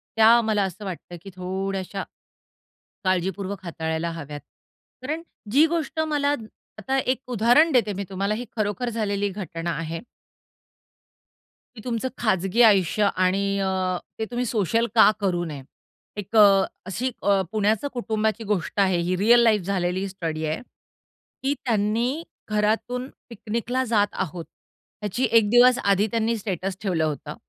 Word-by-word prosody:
त्या 225 +2 +7
मला 215 -2 +1
असं 195 +2 -5
वाटतं, 175 -1 -7
की 195 - -10
थोड्याश्या 190 +1 -3 1.0
काळजीपूर्वक 190 +1 -1
हाताळायला 160 -1 -3
हव्यात. 150 -3 -7 0.6
कारण 310 +5 -3 0.3
जी 290 +8 +5
गोष्ट 325 -1 -2
मला 295 -2 +1 0.4
आता 265 +6 -1
एक 260 -1 0
उदाहरण 245 +8 +4
देते 235 -5 +3
मी 200 +1 -4
तुम्हाला. 195 +2 -1
ही 240 +3 -4
खरोखर 210 +3 -1
झालेली 205 -3 -1
घटना 175 -4 -5
आहे. 165 0 -5 1.7
की 215 - -10
तुमचं 240 0 -2
खाजगी 195 0 +1
आयुष्य 200 0 +3 0.2
आणि 190 +2 +1 0.2
अ, 190 -1 0 0.2
ते 220 - -1
तुम्ही 245 +1 -1
सोशल 225 +1 +1
का 220 - +8
करू 180 -4 0
नये. 150 -4 -6 0.6
एक 205 +2 -6
अ, 200 -2 +7 0.2
अशी 210 +8 -2
अ, 200 -1 +3
पुण्याचं 215 +4 +1
कुटुंबाची 220 -2 -1
गोष्ट 205 -2 -2
आहे. 190 -2 +3
ही 175 +2 0
रिअल 230 +5 +5
लाईफ 220 -3 +4
झालेली 180 -1 -1
ही 195 - -2
स्टडी 165 -4 -4
आहे, 155 +1 -2 0.8
की 275 +1 +2
त्यांनी 235 +6 0 0.3
घरातून 225 +5 0 0.2
पिकनिकला 235 +3 -2
जात 215 -3 +2
आहोत. 175 -2 -4 0.6
याची 210 +5 -2
एक 225 -3 +5
दिवस 245 +2 +6
आधी 200 +1 +3
त्यांनी 230 0 0
स्टेटस 195 -2 -4
ठेवलं 180 -6 0
होतं. 155 -2 -3
205 Hz, 140 wpm, -24 LUFS, 185-230 Hz, 1.7 s, का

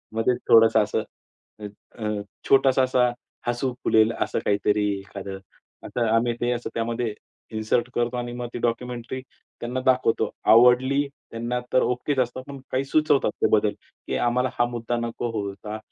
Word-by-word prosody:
मध्येच 120 +2 +2
थोडंसं 115 -1 +7
असं 110 +1 -1 0.6
अ, 105 - -7 0.4
अ, 105 -1 -1 0.3
छोटासा 135 -1 +5
असा 125 -1 +3 0.4
हसू 120 +1 -1
फुलेल 110 0 +4
असं - - 0
काहीतरी 105 +1 +2
एखादं 95 0 -8 0.5
असं 120 -2 -1
आम्ही 120 +1 +2
ते 120 0 +1
असं 120 0 -3
त्यामध्ये 115 -1 -2 0.4
इन्सर्ट 110 +3 0
करतो 120 +1 0
आणि 120 0 -3
मग 120 - -3
ते 120 - -4
डॉक्युमेंटरी 120 +2 -2 0.4
त्यांना 125 +2 -3
दाखवतो. 130 -3 +2 0.2
आवडली 130 +4 +5 0.2
त्यांना 120 +2 -2
तर 130 - +5
ओकेच 130 +3 -1
असतं. 125 +1 -1
पण 140 -1 -8
काही 130 +1 0
सुचवतात 150 0 +2
ते - - +5
बदल - - +3 0.3
की - - -1
आम्हाला 125 +2 +1
हा 120 - +5
मुद्दा 120 0 -2
नको 120 0 -3
होता 105 0 -5
120 Hz, 155 wpm, -24 LUFS, 115-125 Hz, 0.6 s, थोडंसं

